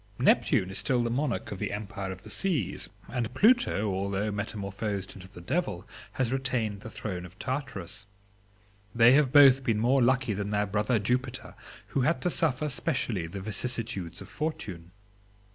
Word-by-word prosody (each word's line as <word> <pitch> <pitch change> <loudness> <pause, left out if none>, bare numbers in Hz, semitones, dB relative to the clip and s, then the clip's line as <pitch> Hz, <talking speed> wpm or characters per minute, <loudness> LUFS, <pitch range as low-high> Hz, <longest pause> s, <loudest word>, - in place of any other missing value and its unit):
Neptune 95 0 +3
is 95 - -1
still 125 -2 +1
the 115 - -1
monarch 130 0 -1
of 100 - -5
the - - -2
empire 100 -2 -5
of 95 0 -9
the 105 - -8
seas, 150 - -1 0.2
and 120 -3 -2
Pluto 215 - +3
(although 100 +2 -1
metamorphosed 100 -1 -4
into 95 -2 -11
the 95 -2 -12
Devil) 105 - -2 0.3
has 125 -3 0
retained 120 -6 -1
the 110 - -8
throne 95 -5 -5
of 90 +1 -12
Tartarus. 105 - -4 0.9
They 115 +1 +7
have 135 -1 +4
both 135 -2 +7
been 115 -3 +1
more 125 +5 +3
lucky 125 -2 +2
than 100 +1 -3
their 105 0 +1
brother 105 +4 +1
Jupiter, 125 +4 -2 0.4
who 135 - 0
had 155 +7 +2
to 180 - +2
suffer 150 -4 +1
specially 125 - -1
the 95 +4 -7
vicissitudes 110 -4 -3
of - - -9
fortune. 100 - -5
110 Hz, 165 wpm, -28 LUFS, 100-130 Hz, 0.9 s, They